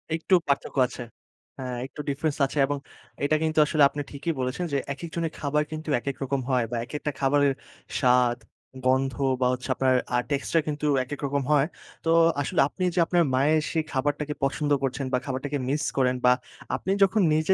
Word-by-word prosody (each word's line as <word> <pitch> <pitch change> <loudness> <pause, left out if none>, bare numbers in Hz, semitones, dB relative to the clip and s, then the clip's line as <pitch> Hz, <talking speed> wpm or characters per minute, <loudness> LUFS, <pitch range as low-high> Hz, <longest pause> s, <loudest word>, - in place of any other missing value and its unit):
একটু 165 +4 -2
পার্থক্য 140 0 -1
আছে। 125 - -9 0.6
হ্যাঁ, 125 -2 -4
একটু 135 - -12
ডিফারেন্স 145 +1 -1
আছে। 140 - -6
এবং 145 +1 -2 0.5
এটা 145 +2 +3
কিন্তু 155 0 -1
আসলে 150 -1 +3
আপনি 145 - -4
ঠিকই 150 +4 -2
বলেছেন 130 +8 -2
যে - - +3 0.2
একেক 150 +5 -8
জনের 165 -2 -2
খাবার 150 +1 +1
কিন্তু 155 0 -5
একেক 140 +2 -4
রকম 135 0 -1
হয়। 125 -3 +2
বা - - -2
একেকটা 150 +3 -4
খাবারের 140 0 +3 0.5
স্বাদ, 125 -2 +4 0.5
গন্ধ 130 +1 +2 0.3
বা 125 - +4
হচ্ছে 125 +2 -5
আপনার 130 0 +2 0.2
আ - - +4
টেস্টা 145 +3 +1
কিন্তু 150 0 -2 0.2
একেক 140 +3 -7
রকম 140 0 0
হয়। 145 -2 +4 0.4
তো - - +1 0.3
আসলে 140 - +1
আপনি 185 - -5
যে - - +2
আপনার 175 0 +3
মায়ের 150 +4 +3
সেই 160 - 0
খাবারটাকে 145 +2 -1
পছন্দ 145 +2 0
করছেন 135 +1 -1
বা - - +4
খাবারটাকে 140 +2 -3
মিস 145 +2 0
করেন। 130 -1 +3
বা 125 - +7 0.4
আপনি 190 - -3
যখন 195 +2 +3
নিজে 155 +4 +3
140 Hz, 185 wpm, -26 LUFS, 130-155 Hz, 0.6 s, বা